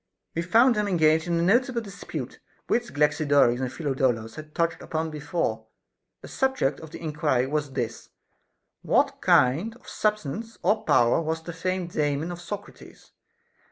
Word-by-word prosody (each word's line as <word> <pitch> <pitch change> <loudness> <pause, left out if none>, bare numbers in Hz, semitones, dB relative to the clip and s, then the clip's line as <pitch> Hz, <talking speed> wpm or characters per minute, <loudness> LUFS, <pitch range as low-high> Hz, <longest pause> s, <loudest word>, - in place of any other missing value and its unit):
20. 170 0 -3
We - - -22
found 240 +4 +6
them 210 -2 0
engaged 160 -3 +3
in 170 -1 +1
a 170 - +1
notable 240 +6 +3
dispute, 200 -3 -7 0.3
which 240 0 0
Galaxidorus 145 -4 +3
and 130 -2 -2
Phidolaus 130 -6 -1
had 155 -1 -11
touched 170 -1 0
upon 160 0 -3
before; 145 -7 -2 0.6
the - - -8
subject 265 - 0
of 160 - -10
the - - -9
enquiry 150 -5 0
was 145 0 -2
this, 120 -3 -4 0.4
— - - -52
What - - +2
kind 160 - +3
of 245 - -20
substance 215 +2 -2
or 215 +1 +2
power 120 +6 +4
was 160 0 -3
the 170 - -6
famed 180 +1 -2
Daemon 150 +2 -1
of 175 0 -7
Socrates'? 205 +3 -9
160 Hz, 160 wpm, -26 LUFS, 145-200 Hz, 0.6 s, found